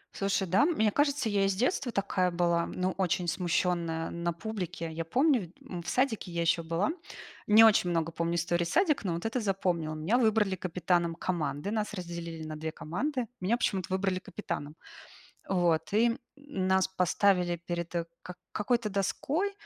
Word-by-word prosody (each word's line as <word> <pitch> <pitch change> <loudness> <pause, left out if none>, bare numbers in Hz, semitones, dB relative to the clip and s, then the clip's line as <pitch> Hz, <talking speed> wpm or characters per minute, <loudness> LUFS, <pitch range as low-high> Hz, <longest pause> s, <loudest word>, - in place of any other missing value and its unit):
Слушай, 195 -1 0
да, 195 - +4
мне 220 -11 +2
кажется, 285 0 +1
я 205 -2 +2
и - - +2
с 195 - 0
детства 250 - 0
такая 190 -3 +1
была, 170 -1 +1
ну 185 +1 -1
очень 180 -2 0
смущенная 170 -2 0
на 170 0 -2
публике. 175 -3 -5
Я 165 +1 -4
помню 260 - +3
в 180 - -6
д 175 - -22 0.2
м, 175 - -3
в - - -6
садике 235 -8 0
я 170 - -1
ещё 170 0 +2
была. 165 - 0 0.6
Не 215 +2 +8
очень 200 -5 +5
много 165 -1 0
помню 170 +1 -1
историй 175 0 0
садика, 305 - +2
но 175 - 0
вот 170 +4 -4
эту 225 +2 -1
запомнила. 180 -6 -1
Меня 170 +11 +1
выбрали 215 -4 +3
капитаном 175 -1 0
команды, 165 0 -2
нас 215 -1 -2
разделили 170 -3 -6
на 155 - -5
2 160 +1 -4
команды. 245 - -2 0.2
Меня 205 +6 +2
почему-то 190 -6 -1
выбрали 190 -1 0
капитаном. 150 -7 -6 0.7
Вот, 170 -4 +2
и 230 +2 +3 0.2
нас 190 -10 0
поставили 180 -1 +2
перед, 170 0 -3
э, 170 - 0 0.2
к 180 - -9 0.2
какой-то 230 +1 0
доской 280 - -1
185 Hz, 175 wpm, -30 LUFS, 170-215 Hz, 0.7 s, Не